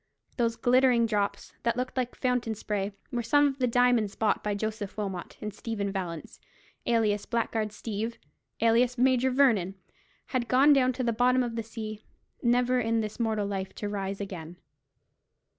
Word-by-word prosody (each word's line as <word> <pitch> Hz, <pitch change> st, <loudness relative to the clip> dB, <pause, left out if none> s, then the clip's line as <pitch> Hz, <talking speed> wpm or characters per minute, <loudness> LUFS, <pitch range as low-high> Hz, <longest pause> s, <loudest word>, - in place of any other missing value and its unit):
Those 230 Hz, -2 st, +1 dB
glittering 245 Hz, -1 st, +4 dB
drops, 205 Hz, -3 st, -2 dB
that 235 Hz, 0 st, 0 dB
looked 255 Hz, +1 st, -3 dB
like 250 Hz, -2 st, -2 dB
fountain 250 Hz, -3 st, 0 dB
spray, 205 Hz, -1 st, -2 dB, 0.2 s
were 240 Hz, -, -1 dB
some 290 Hz, +5 st, +4 dB
of 275 Hz, -1 st, -1 dB
the 250 Hz, -, +2 dB
diamonds 240 Hz, -4 st, +3 dB
bought 220 Hz, -, +1 dB
by 210 Hz, -1 st, -1 dB
Joseph 215 Hz, -1 st, -4 dB
Wilmot; 195 Hz, -4 st, -4 dB
and 210 Hz, -1 st, -4 dB
Stephen 205 Hz, -2 st, -3 dB
Vallance, 175 Hz, -5 st, -5 dB, 0.5 s
alias 215 Hz, -3 st, +1 dB
Blackguard 225 Hz, -2 st, -1 dB
Steeve, 220 Hz, +2 st, -4 dB, 0.4 s
alias 235 Hz, +2 st, +3 dB
Major 255 Hz, +1 st, +3 dB
Vernon, 230 Hz, -9 st, +3 dB, 0.5 s
had 250 Hz, -3 st, -2 dB
gone 275 Hz, +4 st, +6 dB
down 255 Hz, -2 st, +4 dB
to 255 Hz, -, -3 dB
the 235 Hz, -1 st, +1 dB
bottom 250 Hz, +2 st, +3 dB
of 235 Hz, -2 st, -4 dB
the 230 Hz, -, -1 dB
sea, 215 Hz, -1 st, -7 dB, 0.4 s
never 250 Hz, +1 st, +3 dB
in 225 Hz, -1 st, +1 dB
this 215 Hz, +1 st, -5 dB
mortal 220 Hz, -3 st, 0 dB
life 195 Hz, -1 st, -4 dB
to 205 Hz, -, -4 dB
rise 195 Hz, -1 st, -3 dB
again. 180 Hz, -4 st, -6 dB
230 Hz, 165 wpm, -28 LUFS, 205-250 Hz, 0.5 s, gone